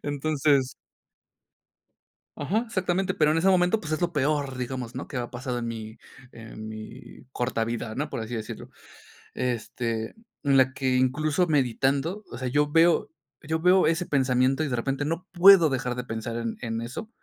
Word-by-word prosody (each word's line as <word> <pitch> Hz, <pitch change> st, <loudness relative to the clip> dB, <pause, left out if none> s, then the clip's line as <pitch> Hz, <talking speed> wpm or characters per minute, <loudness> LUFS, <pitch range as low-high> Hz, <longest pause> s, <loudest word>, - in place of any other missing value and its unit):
Entonces 145 Hz, -2 st, +1 dB, 1.6 s
Ajá, 190 Hz, +10 st, 0 dB
exactamente, 185 Hz, -3 st, -1 dB
pero 150 Hz, -3 st, +3 dB
en 160 Hz, -, +1 dB
ese 180 Hz, +4 st, +2 dB
momento, 180 Hz, +3 st, +3 dB
pues 155 Hz, -2 st, -6 dB
es 155 Hz, -, -1 dB
lo 175 Hz, 0 st, 0 dB
peor, 145 Hz, -2 st, 0 dB
digamos, 125 Hz, -1 st, -5 dB
¿no? 130 Hz, -, -5 dB
Que 135 Hz, -, -6 dB
me 120 Hz, -, -1 dB
ha 120 Hz, -, -9 dB
pasado 125 Hz, 0 st, -4 dB
en 115 Hz, -, -4 dB
mi 110 Hz, -1 st, -7 dB, 0.3 s
en 110 Hz, -1 st, -10 dB
mi 110 Hz, +3 st, -10 dB
corta 120 Hz, -3 st, -1 dB
vida, 115 Hz, -1 st, -4 dB
¿no? 150 Hz, +2 st, -2 dB
Por -, -, -4 dB
así 115 Hz, +2 st, -5 dB
decirlo. 110 Hz, -1 st, -7 dB, 0.7 s
En 125 Hz, -2 st, -1 dB, 1.0 s
la 130 Hz, 0 st, +4 dB
que 130 Hz, -2 st, 0 dB
incluso 150 Hz, +7 st, +1 dB
meditando, 140 Hz, -, 0 dB
o -, -, -6 dB
sea, 130 Hz, 0 st, -3 dB
yo 145 Hz, +3 st, +1 dB
veo 165 Hz, +1 st, +4 dB, 0.3 s
yo 160 Hz, +2 st, -1 dB
veo 180 Hz, +1 st, +5 dB
ese 165 Hz, +2 st, +1 dB
pensamiento 130 Hz, +1 st, +2 dB
y 155 Hz, -, -1 dB
de 125 Hz, -, -1 dB
repente 135 Hz, +4 st, -2 dB
no 165 Hz, +5 st, -3 dB
puedo 180 Hz, -2 st, +8 dB
dejar 125 Hz, -2 st, -2 dB
de 125 Hz, -, -4 dB
pensar 115 Hz, 0 st, -4 dB
en 115 Hz, -1 st, -3 dB
en 115 Hz, -1 st, -3 dB
eso. 130 Hz, -, -6 dB
135 Hz, 180 wpm, -26 LUFS, 125-160 Hz, 1.6 s, puedo